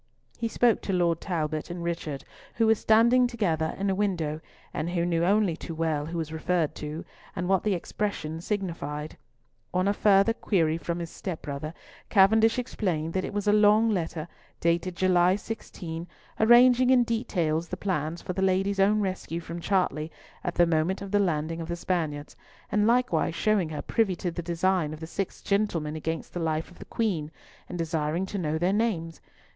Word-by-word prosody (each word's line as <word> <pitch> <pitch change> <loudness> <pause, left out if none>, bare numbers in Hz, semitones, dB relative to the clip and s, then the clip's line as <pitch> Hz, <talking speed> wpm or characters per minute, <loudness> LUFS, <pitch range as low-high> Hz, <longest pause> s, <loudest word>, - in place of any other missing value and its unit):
He 230 - 0
spoke 235 0 +2
to 195 - -3
Lord 170 -2 +1
Talbot 155 -3 -2
and 175 0 -5
Richard, 165 -5 -3 0.3
who 230 - +3
were 220 - +6
standing 235 +3 +4
together 170 -10 -1
in 200 - -1
a 195 - +2
window, 170 -6 -1 0.3
and 155 +3 -2
who 175 -1 0
knew 170 -1 +1
only 195 -1 +3
too 165 0 -7
well 155 -2 -1
who 170 +1 -4
was 160 -1 -3
referred 160 0 0
to, 150 +2 -6 0.3
and 180 - -2
what 190 -1 +3
the 210 -3 +1
expression 165 -4 -3
signified. 170 -7 -4 0.6
On 185 +1 +2
a 200 - +3
further 200 +1 +4
query 165 -8 +1
from 170 0 -3
his 170 -1 -5
step 180 -5 -6
brother, 150 +3 -5 0.3
Cavendish 220 +3 +5
explained 170 -10 -2
that 185 - 0
it - - -4
was 205 0 -3
a 205 - +5
long 210 +2 +5
letter, 165 -4 -2 0.3
dated 170 +2 0
July 180 0 +4
16, 175 -6 -6 0.3
arranging 245 +2 +6
in 255 -2 +6
detail 185 -10 0
the 170 +2 -7
plan 165 -5 -1
for 180 - -5
"the 190 - -2
Lady's" 190 +1 +1
own 210 +2 +4
rescue 185 -3 -3
from 170 0 -7
Chartley 165 -5 0 0.3
at 175 - -3
the 175 - +5
moment 170 +4 0
of 195 - -7
the 205 - +3
landing 165 -3 0
of 165 - -5
the 170 - -2
Spaniards, 160 -5 -2 0.4
and 210 0 +3
likewise 235 -10 +2
showing 205 -4 +1
her 155 - -5
privy 210 -5 +1
to 175 +1 -3
the 175 - -4
design 170 -1 0
of - - -14
the 160 - -6
six 190 +3 -5
gentlemen 175 -7 0
against 160 +1 -4
the 175 - -3
life 160 0 -1
of 175 - -17
the - - -9
Queen, 180 -10 -1 0.4
and 180 - -5
desiring 165 +1 -1
to 200 +1 -4
know 155 -2 -1
their 180 +4 +1
names. 190 -7 -1
175 Hz, 190 wpm, -27 LUFS, 160-205 Hz, 0.6 s, were